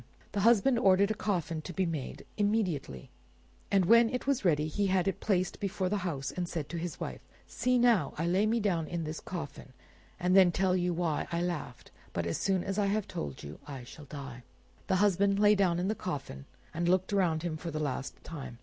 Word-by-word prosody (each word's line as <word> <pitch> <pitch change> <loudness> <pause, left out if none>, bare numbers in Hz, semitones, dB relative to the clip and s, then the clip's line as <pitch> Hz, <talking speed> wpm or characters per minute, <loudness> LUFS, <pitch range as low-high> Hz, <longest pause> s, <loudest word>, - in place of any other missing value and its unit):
The 205 - -2
husband 235 +3 +4
ordered 195 -1 +4
a - - +2
coffin 175 -7 -2
to 180 - -7
be 190 +3 +1
made 155 -6 -5
immediately, 190 - -1 0.6
and 195 -2 +3
when 230 +4 +6
it 250 +1 -3
was 275 -3 +1
ready 155 -5 +3
he 200 +6 0
had 185 0 +2
it 195 - -1
placed 185 -3 0
before 195 -2 -1
the 205 - 0
house, 160 -8 -3
and 175 -1 -3
said 155 -4 -4
to 170 - -4
his 170 0 -5
wife— - - -5 0.2
"See 250 0 +1
now, 235 - +3
I 165 - -1
now 170 - +1
lay 195 +4 +3
me 230 +2 +2
down 175 -7 0
in 170 -2 -3
this 155 0 -4
coffin, 145 -6 -7 0.5
and 180 0 +2
then 185 -2 +7
tell 190 0 +2
you 180 -1 +1
why 165 -3 -1
I 170 0 0
laughed; 160 -8 -5 0.2
but 85 - -1
as 85 - -2
soon 190 -2 +1
as 195 +1 -2
I 200 - +2
have 205 0 0
told 70 -3 -5
you 75 +1 -9
I 135 -4 -7
shall 145 +4 -12
die." 140 -4 -8 0.5
The 190 - +2
husband 200 0 +2
lay 210 0 +6
down 190 -4 +2
in 180 +2 -1
the 215 - +1
coffin, 140 - -5 0.3
and 170 +2 0
looked 185 +2 +2
around 170 -5 +2
him 170 -3 -2
for 170 +2 -6
the 155 - -4
last 135 -3 -4
time. 140 -7 -8
180 Hz, 220 wpm, -30 LUFS, 155-200 Hz, 0.6 s, then